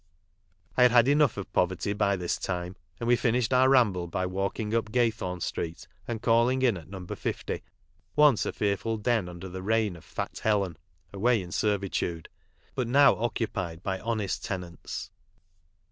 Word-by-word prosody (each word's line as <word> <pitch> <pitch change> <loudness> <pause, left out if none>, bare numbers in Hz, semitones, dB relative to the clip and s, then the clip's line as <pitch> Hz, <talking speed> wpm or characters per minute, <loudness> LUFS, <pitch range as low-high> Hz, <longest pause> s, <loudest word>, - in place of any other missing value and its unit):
I - - +4
had 125 - +8
had 120 0 +5
enough 145 -5 +3
of 100 - -4
Foverty 95 +3 +1
by 100 -1 +2
this 90 -2 -2
time, 90 0 -3 0.2
and - - -3
we 120 - +6
finished 120 -1 +1
our 130 +1 +5
ramble 105 -10 +3
by 95 +2 -2
walking 100 +4 -2
up 115 -2 0
Gay 120 -1 +3
thorn 90 -5 -5
street 80 0 -4 0.2
and 110 -2 -4
calling 120 +3 +3
in 120 -5 +4
at 85 -2 -10
No. 95 -2 -7
50, - - -4 0.5
once 150 -6 +5
a - - -1
fearful 105 +2 -1
den 110 -4 0
under 90 +2 -8
the 95 0 -6
reign 110 -1 +1
of 80 - -13
Fat - - -5
Helen 100 -6 +1 0.4
(away 115 +4 +2
in 90 -2 -7
servitude), 95 -5 -1 0.4
but 125 -3 -1
now 140 +4 +6
occupied 100 -7 -3
by 95 -1 -2
honest 110 -4 -2
tenants. 90 -3 -6
105 Hz, 170 wpm, -28 LUFS, 90-120 Hz, 0.5 s, had